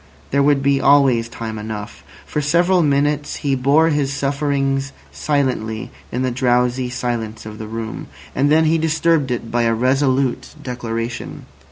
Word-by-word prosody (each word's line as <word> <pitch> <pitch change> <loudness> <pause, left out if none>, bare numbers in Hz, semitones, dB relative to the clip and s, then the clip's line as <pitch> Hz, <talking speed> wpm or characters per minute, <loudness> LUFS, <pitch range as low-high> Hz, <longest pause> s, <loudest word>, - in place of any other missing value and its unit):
There 140 - +3
would 140 -1 +3
be 140 0 +2
always 135 -5 +4
time 110 -2 -6
enough. 105 -1 -7 0.2
For 150 - -2
several 175 +5 +3
minutes 145 0 +1
he 140 -2 -1
bore 140 +5 +3
his 145 -3 0
sufferings 140 -1 -1 0.2
silently 125 -7 -1 0.2
in 125 +2 -1
the 130 - 0
drowsy 125 0 +1
silence 115 -3 -4
of 110 0 -8
the 110 - -6
room. 115 0 -6 0.3
And 140 +2 +2
then 160 +1 +5
he 160 +1 +3
disturbed 160 -2 +1
it 120 -2 -3
by 120 - +1
a 115 -1 +2
resolute 130 +2 +1
declaration. 120 -3 -5
135 Hz, 155 wpm, -19 LUFS, 120-145 Hz, 0.3 s, then